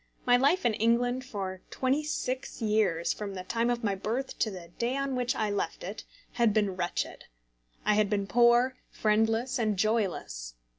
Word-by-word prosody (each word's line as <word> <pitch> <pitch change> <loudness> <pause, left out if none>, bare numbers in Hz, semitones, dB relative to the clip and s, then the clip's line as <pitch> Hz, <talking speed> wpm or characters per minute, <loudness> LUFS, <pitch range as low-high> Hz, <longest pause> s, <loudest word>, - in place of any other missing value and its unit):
My 245 - +6
life 285 +9 +3
in 235 - +4
England 245 +4 +1
for 195 -7 -5
twenty 270 +3 0
six 260 -3 -3
years 210 -7 +1
from 200 -2 -6
the 185 - -5
time 230 +5 0
of 240 0 -1
my 205 -2 +1
birth 225 +7 -3
to 220 - +2
the 180 -4 -9
day 245 +3 0
on 275 -1 -1
which 250 -1 0
I 215 -2 0
left 200 -5 -2
it, 200 +4 -6 0.3
had 235 -3 +2
been 205 -3 +2
wretched. 175 -1 -3 0.6
I 210 - +4
had 210 -1 +3
been 200 -1 0
poor, 240 +3 +4
friendless, 225 +4 +1
and 215 -3 +1
joyless. 185 - -1
220 Hz, 180 wpm, -29 LUFS, 200-245 Hz, 0.6 s, My